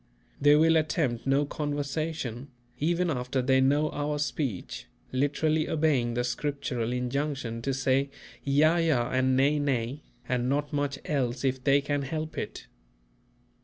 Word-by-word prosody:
They 145 +1 +7
will 160 +2 +5
attempt 150 -6 0
no 140 +2 +3
conversation, 145 -3 -3 0.3
even 170 +3 +1
after 125 0 -2
they 130 +1 +3
know 145 +3 +2
our 150 0 -2
speech, 135 - -3 0.2
literally 155 +4 +1
obeying 140 -7 +1
the 120 - +1
Scriptural 125 -2 -2
injunction 125 -1 -2
to 135 - -1
say 135 +1 +1 0.3
"Yea, 155 +5 +3
yea 160 - +4 0.2
and 130 0 +2
nay, 145 +3 +3
nay," 135 -1 -1 0.3
and 125 0 0
not 145 +2 -1
much 145 -1 -1
else 130 -3 -1
if 130 -1 0
they 140 +1 +4
can 145 0 -1
help 155 +3 -4
it. - - -5
140 Hz, 140 wpm, -28 LUFS, 130-150 Hz, 0.3 s, They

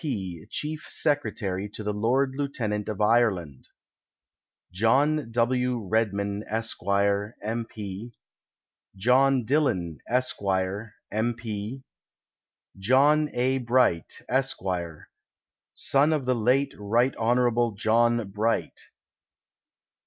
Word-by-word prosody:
P., 95 - -4
Chief 155 +1 -4
Secretary 105 -10 -1
to 110 - -6
the 105 0 -1
Lord 130 +6 +1
Lieutenant 115 -7 -2
of 105 - -4
Ireland. 105 - +1 1.0
John 130 +8 +2
AV. 120 +1 +3 0.2
Redmond, 100 -2 -1
Esq., 115 +1 -2 0.6
M. 115 +2 -2
P. 105 +2 -7 0.8
John 125 +4 +3
Dillon, 95 - 0
Esq., 125 +1 0 0.7
M. 115 +3 0
P. 115 +2 -6 1.0
John 145 +8 +4
A. 130 +2 +1
Bright, 120 -9 +1
Esq., 135 +1 0 1.2
son 145 +3 +3
of 145 -4 -1
the 130 - +2
late 125 +5 +2
Rt. 115 +6 +1
Hon. 120 -1 +2
John 115 +1 +2
Bright. 110 +3 -1
115 Hz, 95 wpm, -26 LUFS, 105-130 Hz, 1.2 s, John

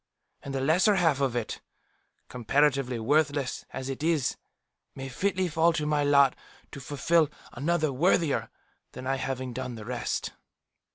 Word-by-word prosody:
And 140 -1 -6
the 135 - -1
lesser 180 +9 +4
half 160 -7 +2
of 130 -3 +1
it, 120 -3 -3 0.7
comparatively 130 +1 +1
worthless 145 +2 0
as 135 0 -5
it 135 0 -5
is, 155 -5 +1 0.6
may 135 0 -6
fitly 185 +6 0
fall 165 +1 +3
to 155 -2 -2
my 150 -1 +1
lot 140 -2 +5 0.4
to - - -8
fulfil, 145 +4 +1 0.2
another 155 +3 0
worthier 160 +1 +2 0.4
than 130 - -8
I 135 +1 0
having 130 -1 -4
done 125 0 -5
the 110 -2 -9
rest." 125 +1 -3
140 Hz, 150 wpm, -28 LUFS, 130-155 Hz, 0.7 s, lot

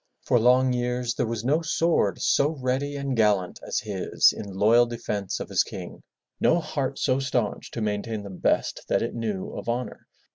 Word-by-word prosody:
For 125 -2 +3
long 125 +2 +4
years 125 0 -1
there - - -1
was 115 0 -4
no 150 +5 +2
sword 165 - +1
so 150 +3 +2
ready 135 +3 -1
and 140 -2 -2
gallant 105 -5 +2
as - - -2
his 100 -4 +2
in 100 - -7
loyal 115 +5 +4
defence 105 -5 -3
of - - -5
his - - +3
king, - - -8 0.4
no 170 - +3
heart 135 -4 -3
so 130 +1 +1
staunch 125 -5 -2
to 115 - -5
maintain 105 0 -2
the 100 - -8
best 90 - 0
that - - +1
it - - -3
knew 110 -5 -3
of - - -6
honor. 120 +2 -4
120 Hz, 185 wpm, -25 LUFS, 105-130 Hz, 0.4 s, long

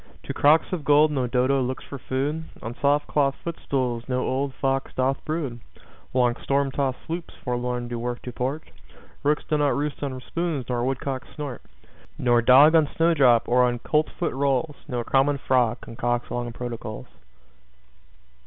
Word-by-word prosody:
To - - -5
crocks 155 +5 +4
of 170 -5 -2
gold 150 +1 +5
no 130 -4 0
Dodo 130 +3 +2
looks 130 +1 -3
for 140 - -8
food. 145 +6 -2 0.2
On 115 - -4
soft 145 +1 +3
cloth 140 -2 +1
footstools 130 -7 -2
no 125 -1 0
old 135 +2 -1
fox 135 0 -1
doth 130 +1 0
brood. 150 -7 -3 0.5
Long 125 -2 +2
storm 140 0 0
tost 135 -1 -1
sloops 170 +1 -5
forlorn 125 -1 -2
do 120 -1 -4
work 120 +1 -3
to 125 - -5
port. 135 +6 -4 0.5
Rooks 150 +1 +1
do 150 - +1
not 145 -1 +2
roost 145 +1 -3
on 135 -3 -3
spoons, 165 -2 -3
nor 120 -1 -1
woodcocks 130 0 -2
snort 145 -5 -5 0.6
Nor 120 -1 +3
dog 135 +6 +7
on 160 -3 +4
snowdrop 140 -9 +4
or 125 +1 +4
on 120 -1 +1
coltsfoot 150 +5 -1
rolls. 140 +2 0
Nor 125 -4 -2
common 135 +4 +2
frog 125 -3 +1
concocts 120 0 -2
long 120 -1 -3
protocols. 115 -3 -6
135 Hz, 160 wpm, -25 LUFS, 125-145 Hz, 0.6 s, dog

